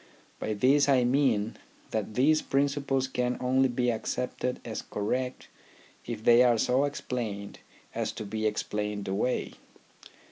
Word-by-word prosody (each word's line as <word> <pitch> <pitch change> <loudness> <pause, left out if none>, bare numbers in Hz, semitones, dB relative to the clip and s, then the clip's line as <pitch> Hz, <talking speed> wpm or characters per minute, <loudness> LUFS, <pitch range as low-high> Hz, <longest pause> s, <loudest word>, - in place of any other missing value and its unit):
By 110 - -2
this 140 +6 +4
I 130 -3 +5
mean 120 -4 +1 0.3
that 110 -1 -3
these 155 +5 +4
principles 140 -1 0
can 125 -1 -1
only 130 +1 +2
be 125 0 +1
accepted 125 +2 -3
as 110 -2 -4
correct 125 +5 -3 0.6
if 115 -2 -5
they 120 +1 +7
are 120 -2 +5
so 130 +5 +2
explained 115 -8 -4 0.3
as - - -2
to 110 - -6
be 110 +1 -1
explained 105 -1 -3
away. 100 +6 -1
125 Hz, 135 wpm, -28 LUFS, 110-130 Hz, 0.6 s, they